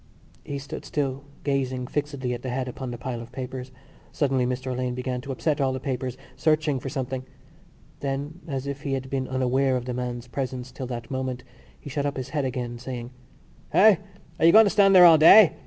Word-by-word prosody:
He 140 - -5
stood 140 +1 -7
still, 140 -1 -2 0.2
gazing 130 -3 -1
fixedly 140 -2 -3
at 120 - -5
the 130 - -4
head 130 +1 -2
upon 130 +1 -5
the 120 - -5
pile 120 -1 -5
of 120 +1 -11
papers. 130 0 -6 0.4
Suddenly 130 -4 +1
Mr 130 +1 -3
Alleyne 125 0 -2
began 125 0 -3
to 135 - -6
upset 145 +2 0
all 135 -1 +2
the 130 - -3
papers, 130 -2 -3 0.2
searching 155 -3 +1
for 135 - -5
something. 130 -2 -3 0.8
Then, 140 +4 -4
as 135 -3 -3
if 140 0 -5
he 140 -2 -2
had 130 -1 -4
been 130 -1 -1
unaware 130 +1 +1
of 125 - -5
the 125 - -3
man's 120 -1 -4
presence 130 -1 -4
till 130 - -6
that 120 +1 -6
moment, 130 -1 -3 0.4
he - - -13
shot 145 0 -1
up 140 - -3
his 130 - -5
head 145 -3 -1
again, 120 -2 -4
saying: 125 -1 -6 0.6
"Eh? 210 -2 +7 0.4
Are - - +4
you - - +8
going 220 +3 +8
to 200 - +2
stand 195 -2 +5
there 180 -1 +10
all 165 -2 +8
day? 180 +4 +9
130 Hz, 210 wpm, -25 LUFS, 125-140 Hz, 0.8 s, there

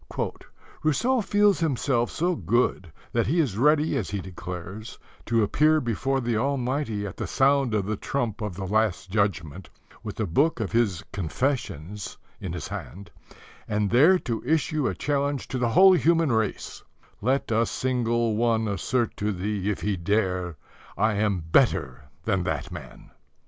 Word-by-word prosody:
"Rousseau 235 - +2
feels 205 0 +3
himself 135 -6 +1
so 175 +2 0
good 115 - 0 0.2
that - - +1
he 165 +7 +1
is 135 -12 +1
ready, 150 +6 +3
as 105 - -2
he 100 - -2
declares, 90 +4 -7 0.3
to 115 -2 +3
appear 155 +9 +3
before 135 +2 -1
the 120 -2 -1
Almighty 130 -3 -1
at 100 - -7
the - - -3
sound 135 -3 +2
of 100 -3 0
the 105 0 -2
trump 120 -4 -2
of 105 -4 -3
the 95 +1 -5
Last 100 -2 0
Judgment, 95 -5 -1 0.3
with 105 - -6
the 110 - -1
book 140 - +1
of 110 - -2
his 115 -7 +1
Confessions 105 - -3 0.2
in 95 -4 -5
his 85 -3 -5
hand, 100 +4 -8 0.6
and 105 -1 0
there 155 +11 +6
to 120 -9 -3
issue 155 0 +1
a 95 - -2
challenge 140 - -1
to 130 - -2
the 120 -1 +1
whole 190 +10 +7
human 165 -4 +3
race, 110 -2 -2 0.4
'Let 130 +3 0
a 115 +1 +2
single 120 -3 0
one 115 -1 +1
assert 110 +4 -1
to 105 +1 -1
Thee 100 +1 -2
if 105 - -2
he 100 -2 -1
dare: 90 -3 -1 0.4
"I 110 0 +2
am 100 -4 0
better 65 -2 +2 0.2
than 95 0 +1
that 80 -6 -3
man."'" - - -10
115 Hz, 160 wpm, -26 LUFS, 100-135 Hz, 0.6 s, whole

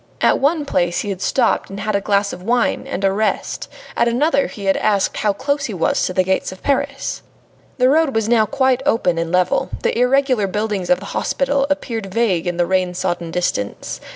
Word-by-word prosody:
At - - +3
one 295 +2 +1
place 175 -8 0
he 205 - -5
had 190 -2 -4
stopped 190 - +1
and 195 +1 -7
had 215 -1 -1
a 200 - +1
glass 200 0 +1
of 180 - -8
wine 240 +5 0
and 195 - -4
a 195 - +3
rest, 215 +2 -2 0.3
at 235 - +2
another 280 +4 +2
he 200 - -8
had 195 - +3
asked 200 -2 +1
how 210 - +2
close 280 +6 -1
he 215 - -4
was 165 - +1
to - - -3
the 185 - +2
gates 190 0 -1
of 185 - -12
Paris. 280 0 -1 0.6
The 255 -1 +4
road 295 -1 +3
was 225 -1 +1
now 225 -2 +3
quite 260 +3 +1
open 225 -11 +1
and 165 0 -2
level; 180 0 +1
the - - +1
irregular 250 -3 +2
buildings 205 -2 -2
of 270 - +4
the - - -9
hospital 275 0 0
appeared 230 -8 -3
vague 190 -6 +1
in 175 -1 -2
the 175 - +2
rain 185 0 0
sodden 175 -2 -2
distance. 165 - -3
210 Hz, 210 wpm, -19 LUFS, 185-260 Hz, 0.6 s, The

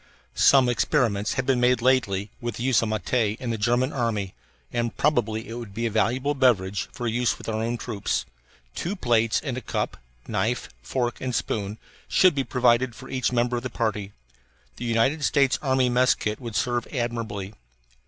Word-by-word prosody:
Some 135 -2 +5
experiments 115 -4 +1
have 130 - -1
been 130 -2 +2
made 125 -1 +4
lately 110 -6 +1
with 120 -2 -3
the 115 - -5
use 130 -1 +3
of 115 - -1
matte 110 -1 -3 0.3
in 125 -2 -3
the - - 0
German 120 +5 +1
army, 110 -7 -1 0.4
and 120 -1 -1
probably 115 -7 +1
it 115 - -7
would 115 -4 -8
be 115 +1 -1
a 115 - 0
valuable 125 +6 +1
beverage 105 -9 +1
for 120 - -6
the 110 - -1
use 120 0 +1
of - - -10
our 110 -1 -1
own 120 +2 -1
troops. 110 -4 -2 0.5
Two 180 +5 -3
plates 115 - +2
and 130 -4 -3
a - - -4
cup, - - -3 0.3
knife, - - -1
fork, 120 - -2
and 125 -2 -2
spoon 105 0 -2 0.3
should 185 -2 +5
be 140 -1 0
provided 125 -1 +2
for - - -11
each 130 -1 0
member 120 0 +1
of - - -3
the 130 - -4
party. 105 -4 -2 0.7
The 120 - -5
United 120 +7 +1
States 140 -2 +3
Army 130 -2 +2
mess 125 +1 +3
kit 105 0 -3
would 115 -3 -6
serve 120 +3 0
admirably. 115 -5 -3
120 Hz, 190 wpm, -25 LUFS, 110-130 Hz, 0.7 s, Some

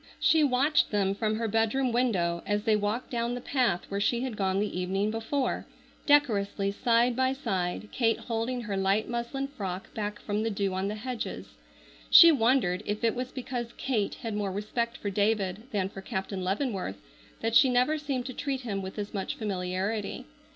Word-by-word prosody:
She 320 -1 +4
watched 285 +2 +3
them 195 -2 +1
from 215 +1 -1
her 225 +1 -1
bedroom 225 +4 +1
window 185 -9 +1
as 205 0 0
they 220 -1 +3
walked 210 +4 -2
down 235 0 -1
the - - -4
path 245 -8 0
where 200 - -3
she 235 +4 +1
had 255 -3 -3
gone 190 -1 0
the 205 -3 -2
evening 195 +3 0
before, 225 +5 -2 0.4
decorously 205 -9 +3
side 235 +3 +2
by 260 +1 +2
side, 190 -7 -2
Kate 225 -2 +2
holding 235 +2 -2
her 210 -4 -3
light 195 +2 +1
muslin 240 +3 -3
frock 195 -8 -6
back 210 -1 -3
from 210 0 -2
the 225 - 0
dew 200 -2 -1
on 190 +1 -1
the 210 - -3
hedges. 245 +2 -5 0.6
She 335 -1 +10
wondered 230 - +2
if 210 +2 -2
it 230 - +3
was 255 +1 -4
because 245 -2 -5
Kate 220 -7 -1
had 225 -2 -3
more 205 -2 -1
respect 235 +4 -2
for 205 - -3
David 205 +1 0
than 200 -6 0
for 195 0 -9
Captain 190 0 -4
Leavenworth 195 - -2 0.4
that 225 0 0
she 265 - +7
never 250 +5 +2
seemed 275 -4 -2
to 255 - -5
treat 270 -1 -3
him 205 -6 -3
with 190 +2 -7
as 205 0 -4
much 195 -2 -3
familiarity. 195 +1 -3
220 Hz, 185 wpm, -28 LUFS, 200-250 Hz, 0.6 s, She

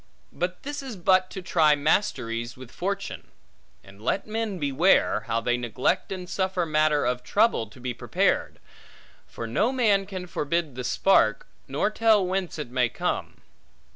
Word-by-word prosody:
But 180 +1 -3
this 290 +1 -4
is 265 -5 -7
but 185 0 +3
to 190 - -7
try 155 -4 +4
masteries 125 - 0
with 130 -1 -11
fortune. 195 +2 -4 0.6
And 100 +1 -16
let 130 - -1
men 220 -2 -3
beware, 150 +4 +2
how 115 +1 0
they 120 +1 +1
neglect 125 - -1
and 185 -2 -5
suffer 185 -2 -1
matter 155 -1 +2
of 125 0 0
trouble 205 - +2
to 110 +5 -16
be 125 0 -3
prepared; - - 0 0.7
for 115 - -7
no 165 - +1
man 210 -7 +2
can 185 -2 -6
forbid 165 -2 -2
the 125 +1 -5
spark, 125 - +3 0.2
nor 140 +10 0
tell 215 -3 +3
whence 185 -2 -2
it 145 -6 -6
may 125 -2 +2
come. - - -3
170 Hz, 160 wpm, -26 LUFS, 125-195 Hz, 0.7 s, try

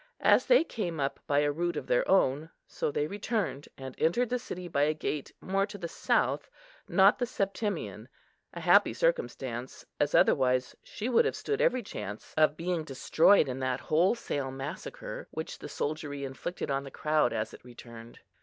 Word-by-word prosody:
As - - +5
they - - +6
came 175 - -4
up 135 0 -1
by 145 0 +3
a 145 0 +2
route 175 +3 -2
of - - -4
their - - +1
own, 150 -3 +3 0.2
so - - -3
they 145 0 -1
returned, 200 - -3
and 130 -1 -7
entered 220 +10 +2
the 250 - +1
city 180 -7 -7
by 145 -4 0
a 155 +2 +2
gate 150 -2 -3
more 195 +1 0
to 205 - -8
the 175 -3 -5
south, - - 0 0.4
not 195 +3 +5
the 245 - 0
Septimian; 205 -1 -3 0.4
a - - -7
happy - - +5
circumstance, 135 - -2
as 145 0 +1
otherwise 130 -2 +3
she 220 - -6
would 245 -2 +4
have - - 0
stood 430 - -2
every 250 -1 +2
chance 105 - -7
of 155 -1 +3
being 170 -1 -1
destroyed 155 +5 +4
in 130 0 -4
that 130 -1 -1
wholesale 160 - 0
massacre 135 +2 -7
which - - -6
the - - -8
soldiery 145 -1 -3
inflicted 135 +4 -5
on 135 0 0
the 140 - -8
crowd 150 -1 +1
as 110 -1 -3
it - - -13
returned. 120 -1 -12
155 Hz, 180 wpm, -29 LUFS, 135-195 Hz, 0.4 s, they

